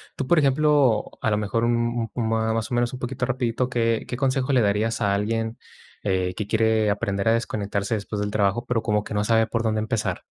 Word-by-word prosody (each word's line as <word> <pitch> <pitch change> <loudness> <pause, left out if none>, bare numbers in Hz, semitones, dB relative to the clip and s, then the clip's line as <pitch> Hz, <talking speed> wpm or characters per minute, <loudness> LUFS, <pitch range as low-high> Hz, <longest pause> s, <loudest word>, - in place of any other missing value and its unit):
Tú, 135 - -3
por 175 - +4
ejemplo, 140 -5 +3
a 110 - +1
lo 105 - +2
mejor, 105 +2 -1
m 120 0 0
m 120 -3 -1 0.3
más 115 0 -2
o 125 - -1
menos 120 +1 0
un 130 - -6
poquito 125 0 -3
rapidito, 125 -1 -1
¿qué 115 -2 0
qué - - -4
consejo 135 +1 0
le 125 - +4
darías 105 +2 0
a 100 -1 +2
alguien, 115 +2 -2 0.5
eh, 95 -2 0
que 105 - -2
quiere 110 -1 +2
aprender 100 0 -1
a 115 - +5
desconectarse 105 -2 -1
después 105 0 -4
del 105 - -1
trabajo, 105 +3 0
pero 115 -2 0
como 105 -1 +1
que 105 - -6
no 105 - +1
sabe 115 0 +3
por 115 +1 -1
dónde 110 -1 0
empezar? 110 0 -2
115 Hz, 220 wpm, -24 LUFS, 105-120 Hz, 0.5 s, a